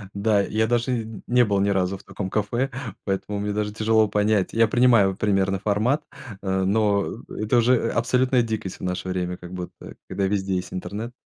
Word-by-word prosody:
Да, 100 Hz, 0 st, +2 dB
я 110 Hz, +2 st, 0 dB
даже 120 Hz, +1 st, +1 dB
н 115 Hz, -3 st, -4 dB
не 125 Hz, 0 st, +4 dB
был 100 Hz, -3 st, +1 dB
ни 100 Hz, -, +2 dB
разу 95 Hz, -1 st, 0 dB
в -, -, -18 dB
таком 100 Hz, -1 st, -5 dB
кафе, 110 Hz, +6 st, -1 dB, 0.3 s
поэтому 100 Hz, +1 st, -2 dB
мне 105 Hz, 0 st, -2 dB
даже 105 Hz, 0 st, -2 dB
тяжело 110 Hz, 0 st, +3 dB
понять. 105 Hz, -1 st, +1 dB
Я 115 Hz, 0 st, +4 dB
принимаю 115 Hz, -6 st, +4 dB
примерный 95 Hz, -2 st, +1 dB
формат, 110 Hz, +9 st, +1 dB, 0.4 s
э, 95 Hz, 0 st, 0 dB
но, 100 Hz, 0 st, +2 dB, 0.3 s
э, 110 Hz, -, -5 dB
это 110 Hz, +3 st, +2 dB
уже, 120 Hz, +2 st, +4 dB
э, 115 Hz, -, 0 dB
абсолютная 125 Hz, +1 st, +2 dB
дикость 110 Hz, -5 st, -4 dB
в -, -, -11 dB
наше 90 Hz, 0 st, -3 dB
время, 90 Hz, -1 st, -2 dB
как 90 Hz, +1 st, -10 dB
будто 90 Hz, -1 st, -8 dB
когда 100 Hz, -, -1 dB
везде 95 Hz, -1 st, -1 dB
есть 90 Hz, 0 st, -4 dB
интернет. 105 Hz, +6 st, -5 dB
105 Hz, 195 wpm, -24 LUFS, 95-115 Hz, 0.4 s, не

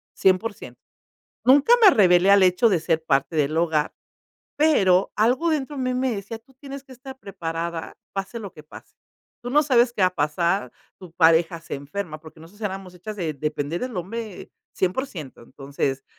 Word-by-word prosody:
100% 185 Hz, -, 0 dB, 0.7 s
nunca 280 Hz, -, +6 dB
me 405 Hz, -, +10 dB
revelé 180 Hz, -2 st, +5 dB
al 200 Hz, -1 st, +6 dB
hecho 185 Hz, +6 st, +4 dB
de 180 Hz, -5 st, +1 dB
ser 160 Hz, -1 st, -1 dB
parte 140 Hz, +2 st, 0 dB
del 150 Hz, +1 st, 0 dB
hogar, 160 Hz, -3 st, 0 dB, 0.6 s
pero 195 Hz, -, +3 dB
algo 250 Hz, +10 st, +2 dB
dentro 295 Hz, -2 st, -2 dB
a -, -, -5 dB
mí 255 Hz, 0 st, -1 dB
me 255 Hz, 0 st, 0 dB
decía: 205 Hz, +3 st, -6 dB
"Tú 260 Hz, +4 st, -27 dB
tienes 275 Hz, +1 st, -10 dB
que 265 Hz, -, -15 dB
estar 265 Hz, +1 st, -11 dB
preparada 170 Hz, -5 st, -5 dB, 0.2 s
pase 195 Hz, +4 st, -4 dB
lo 200 Hz, -4 st, -8 dB
que 155 Hz, -, -13 dB
pase. 150 Hz, -, -14 dB, 0.5 s
Tú 245 Hz, -, -5 dB
no 295 Hz, +3 st, +4 dB
sabes 250 Hz, -4 st, +3 dB
qué 210 Hz, -, -2 dB
va 185 Hz, -, +6 dB
a 180 Hz, -, -18 dB
pasar, 170 Hz, +5 st, 0 dB, 0.3 s
tu 180 Hz, -3 st, -13 dB
pareja 165 Hz, 0 st, +3 dB
se -, -, -7 dB
enferma", 155 Hz, +4 st, -6 dB
porque 160 Hz, 0 st, -15 dB
nosotros 175 Hz, +7 st, -16 dB
éramos 190 Hz, -2 st, -5 dB
hechas 210 Hz, +4 st, -8 dB
de 170 Hz, -5 st, -2 dB
depender 150 Hz, +3 st, -3 dB
del 250 Hz, -4 st, -5 dB
hombre 205 Hz, +3 st, -6 dB, 0.2 s
100% 185 Hz, -, -3 dB
Entonces, 135 Hz, +1 st, -4 dB
185 Hz, 180 wpm, -23 LUFS, 165-235 Hz, 0.7 s, me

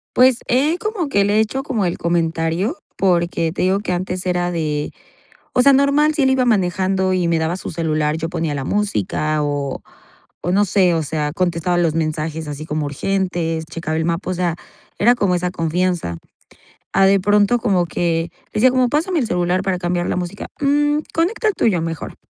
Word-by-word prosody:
Pues, 255 Hz, -1 st, +5 dB
he 285 Hz, +7 st, +2 dB
como 420 Hz, -7 st, -2 dB
que 200 Hz, -7 st, +2 dB
le 205 Hz, +1 st, +1 dB
he -, -, +5 dB
hecho 220 Hz, +5 st, -1 dB
como 255 Hz, -8 st, -1 dB
el 175 Hz, -, -1 dB
comentario 170 Hz, -, 0 dB, 0.2 s
porque, 170 Hz, -3 st, +1 dB
te -, -, -3 dB
digo 190 Hz, +2 st, +2 dB
que 200 Hz, -3 st, -3 dB
antes 180 Hz, +1 st, -3 dB
era 175 Hz, -1 st, 0 dB
de 150 Hz, -3 st, -2 dB, 0.6 s
o 250 Hz, -, +4 dB
sea, 280 Hz, +2 st, +6 dB
normal, 280 Hz, +3 st, +3 dB
si 300 Hz, -, 0 dB
él 265 Hz, -, +4 dB
iba 265 Hz, -1 st, +2 dB
manejando 190 Hz, -3 st, +1 dB
y 180 Hz, -2 st, +1 dB
me 170 Hz, -1 st, +2 dB
daba 160 Hz, +2 st, -1 dB
su -, -, -6 dB
celular, 155 Hz, -2 st, 0 dB
yo 165 Hz, 0 st, -3 dB
ponía 165 Hz, -4 st, -2 dB
la 135 Hz, -, -3 dB
música 155 Hz, -, -1 dB
o 145 Hz, -2 st, -2 dB, 0.6 s
o 175 Hz, -, 0 dB
no 205 Hz, +3 st, +3 dB
sé, 185 Hz, -3 st, +3 dB
o 160 Hz, -, 0 dB
sea, 150 Hz, 0 st, -2 dB
contestaba 175 Hz, 0 st, 0 dB
los 170 Hz, -3 st, +2 dB
mensajes 155 Hz, 0 st, -2 dB
así 150 Hz, +1 st, -6 dB
como 155 Hz, -1 st, -2 dB
urgentes, 165 Hz, 0 st, -2 dB
checaba 160 Hz, -1 st, -4 dB
el 160 Hz, -, 0 dB
mapa, 170 Hz, +2 st, -2 dB
o -, -, 0 dB
sea, 175 Hz, -2 st, -1 dB, 0.4 s
era 235 Hz, +4 st, +5 dB
como 200 Hz, -6 st, +1 dB
esa 180 Hz, 0 st, -1 dB
confianza. 170 Hz, -, -1 dB, 0.8 s
A 195 Hz, -, +5 dB
de 195 Hz, 0 st, +4 dB
pronto 205 Hz, +4 st, +3 dB
como 195 Hz, -7 st, +1 dB
que 165 Hz, 0 st, -1 dB, 0.2 s
decía 250 Hz, +4 st, +4 dB
como 255 Hz, -1 st, +2 dB
pásame 325 Hz, +5 st, 0 dB
el 245 Hz, -, -1 dB
celular 180 Hz, -1 st, 0 dB
para 190 Hz, -1 st, 0 dB
cambiar 175 Hz, 0 st, -1 dB
la -, -, -1 dB
música, 180 Hz, +2 st, -5 dB
mm, 295 Hz, +1 st, +2 dB, 0.2 s
conecta 380 Hz, +7 st, 0 dB
el -, -, 0 dB
tuyo, 185 Hz, -7 st, +1 dB
mejor. 165 Hz, -2 st, -5 dB
180 Hz, 195 wpm, -19 LUFS, 165-210 Hz, 0.8 s, sea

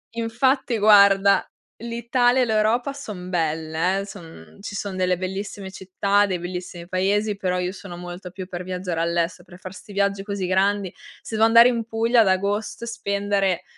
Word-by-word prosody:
Infatti 240 Hz, +2 st, 0 dB
guarda, 200 Hz, -2 st, +5 dB, 0.3 s
l'Italia 240 Hz, +2 st, +1 dB
e 250 Hz, -, +3 dB
l'Europa 220 Hz, +4 st, +1 dB
son 210 Hz, -10 st, -8 dB
belle, 160 Hz, +2 st, -1 dB
eh, 195 Hz, -, -6 dB
son 165 Hz, -, -12 dB
ci 205 Hz, 0 st, -7 dB
son 200 Hz, -2 st, -4 dB
delle 185 Hz, 0 st, +1 dB
bellissime 190 Hz, +1 st, -5 dB
città, 200 Hz, +2 st, +1 dB
dei 185 Hz, -3 st, -2 dB
bellissimi 175 Hz, 0 st, -7 dB
paesi, 200 Hz, +3 st, 0 dB
però 180 Hz, -2 st, -1 dB
io 180 Hz, 0 st, -2 dB
sono 190 Hz, -3 st, -10 dB
molto 180 Hz, +1 st, -8 dB
più 185 Hz, +1 st, -8 dB
per 180 Hz, -1 st, -6 dB
viaggiare 180 Hz, -2 st, -3 dB
all'estero, 170 Hz, +1 st, -1 dB
per 175 Hz, -, -12 dB
far 185 Hz, 0 st, -9 dB
sti 200 Hz, +2 st, -12 dB
viaggi 200 Hz, 0 st, 0 dB
così 200 Hz, -3 st, -3 dB
grandi. 195 Hz, 0 st, +1 dB, 0.3 s
Se 220 Hz, -, -6 dB
devo 220 Hz, +1 st, +5 dB
andare 235 Hz, +2 st, +7 dB
in 230 Hz, -2 st, -2 dB
Puglia 230 Hz, +1 st, +2 dB
ad 215 Hz, -, +3 dB
agosto 200 Hz, +4 st, -1 dB
e -, -, -5 dB
spendere 200 Hz, -4 st, -1 dB
195 Hz, 175 wpm, -23 LUFS, 180-215 Hz, 0.3 s, andare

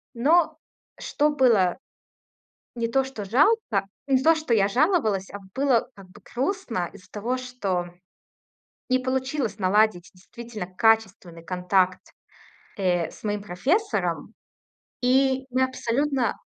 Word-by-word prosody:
Но 310 Hz, +5 st, +3 dB, 0.4 s
что 295 Hz, +1 st, +1 dB
было: 235 Hz, -11 st, +3 dB, 1.0 s
не 230 Hz, -1 st, -2 dB
то, 270 Hz, +3 st, +1 dB
что 260 Hz, -6 st, -7 dB
жалко 245 Hz, -, +2 dB, 0.2 s
не 260 Hz, -1 st, +3 dB
то, 325 Hz, +2 st, +6 dB
что 310 Hz, -7 st, 0 dB
я 200 Hz, -2 st, +3 dB
жаловалась, 240 Hz, -, +1 dB
а 205 Hz, -, -7 dB, 0.2 s
было 260 Hz, -3 st, +1 dB
как 195 Hz, -2 st, -14 dB
бы 210 Hz, +3 st, -16 dB
грустно 255 Hz, -, -2 dB
из-за 185 Hz, -, -16 dB
того, 235 Hz, +5 st, -2 dB
что 205 Hz, -9 st, -3 dB, 1.0 s
не 255 Hz, 0 st, +3 dB
получилось 260 Hz, -3 st, -2 dB
наладить 195 Hz, -1 st, +2 dB
действительно 215 Hz, +2 st, -8 dB
качественный 190 Hz, -4 st, 0 dB
контакт, 180 Hz, 0 st, +1 dB, 0.8 s
э, 180 Hz, -4 st, 0 dB
с -, -, -16 dB
моим 205 Hz, -1 st, -2 dB
профессором. 300 Hz, -, -1 dB, 0.7 s
И 265 Hz, +1 st, +2 dB
мы 255 Hz, +1 st, +1 dB
абсолютно 260 Hz, +1 st, 0 dB
235 Hz, 120 wpm, -25 LUFS, 195-265 Hz, 1.0 s, то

